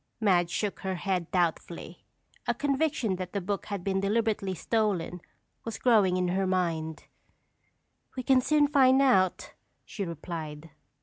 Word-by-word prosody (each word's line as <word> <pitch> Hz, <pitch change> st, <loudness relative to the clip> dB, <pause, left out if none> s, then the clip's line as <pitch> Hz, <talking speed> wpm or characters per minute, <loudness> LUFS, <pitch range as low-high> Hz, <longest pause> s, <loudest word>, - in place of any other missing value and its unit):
Madge 180 Hz, -6 st, +3 dB
shook 205 Hz, +2 st, -2 dB
her 190 Hz, -1 st, -3 dB
head 180 Hz, -2 st, -2 dB
doubtfully. 175 Hz, -3 st, -2 dB, 0.4 s
A -, -, +1 dB
conviction 275 Hz, -8 st, 0 dB
that 185 Hz, -1 st, -6 dB
the 200 Hz, -, 0 dB
book 200 Hz, +2 st, -3 dB
had 200 Hz, -3 st, -4 dB
been 195 Hz, 0 st, 0 dB
deliberately 205 Hz, -1 st, 0 dB
stolen 185 Hz, -4 st, -1 dB, 0.4 s
was 225 Hz, -1 st, -5 dB
growing 205 Hz, -7 st, +3 dB
in 180 Hz, -1 st, 0 dB
her 190 Hz, +1 st, 0 dB
mind. 165 Hz, -4 st, -1 dB, 1.1 s
"We 255 Hz, -, -2 dB
can 260 Hz, 0 st, +4 dB
soon 295 Hz, +2 st, +3 dB
find 265 Hz, -2 st, +5 dB
out," 190 Hz, -10 st, +2 dB, 0.3 s
she 205 Hz, -, -5 dB
replied. 165 Hz, -2 st, -6 dB
195 Hz, 140 wpm, -28 LUFS, 175-225 Hz, 1.1 s, find